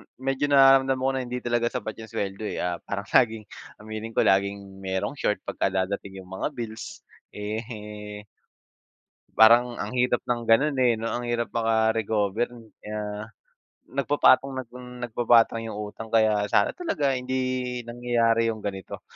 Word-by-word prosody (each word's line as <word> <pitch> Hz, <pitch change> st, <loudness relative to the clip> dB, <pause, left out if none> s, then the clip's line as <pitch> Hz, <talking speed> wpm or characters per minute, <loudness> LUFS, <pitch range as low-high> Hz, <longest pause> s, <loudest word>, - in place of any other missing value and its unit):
medyo 135 Hz, +2 st, -1 dB
nararamdaman 135 Hz, -2 st, +5 dB
ko 135 Hz, -, +2 dB
na 130 Hz, -1 st, -2 dB
hindi 125 Hz, 0 st, -5 dB
talaga 120 Hz, -1 st, +1 dB
sapat 110 Hz, -3 st, -5 dB
'yung 110 Hz, -, -8 dB
suweldo 100 Hz, +1 st, -4 dB
eh, -, -, -3 dB
ah, 90 Hz, -1 st, -2 dB
parang 100 Hz, 0 st, -5 dB
laging, 110 Hz, -3 st, +3 dB, 0.3 s
aminin 110 Hz, +1 st, -7 dB
ko, -, -, +4 dB
laging 100 Hz, 0 st, 0 dB
merong 95 Hz, +9 st, -3 dB
short 105 Hz, -, 0 dB
pagka -, -, -1 dB
dadating 95 Hz, 0 st, -3 dB
'yung 90 Hz, -, -17 dB
mga 95 Hz, -, -2 dB
bills 115 Hz, -2 st, -7 dB, 0.3 s
eh, 105 Hz, -1 st, -6 dB, 1.2 s
parang 120 Hz, +2 st, +6 dB
ang 105 Hz, +4 st, -4 dB
hirap 125 Hz, -1 st, +2 dB
ng 120 Hz, -1 st, -1 dB
ganun 140 Hz, +6 st, +4 dB
eh 120 Hz, -3 st, +4 dB
'no, 115 Hz, -, -4 dB
ang 120 Hz, -, -2 dB
hirap 120 Hz, 0 st, -1 dB
maka-recover, 110 Hz, -1 st, +1 dB, 0.4 s
ah, 105 Hz, 0 st, -4 dB, 0.7 s
nagpapatong 140 Hz, 0 st, +3 dB
nang 125 Hz, -1 st, -7 dB, 0.2 s
nagpapatong 115 Hz, -1 st, +3 dB
'yung 110 Hz, -, -5 dB
utang 105 Hz, +2 st, -7 dB
kaya 110 Hz, -2 st, +3 dB
sana -, -, +3 dB
talaga 320 Hz, -, 0 dB
hindi 125 Hz, -1 st, -2 dB
nangyayari 120 Hz, -1 st, +1 dB
'yung 110 Hz, -, -7 dB
ganito 95 Hz, -3 st, -6 dB
115 Hz, 145 wpm, -25 LUFS, 105-125 Hz, 1.2 s, parang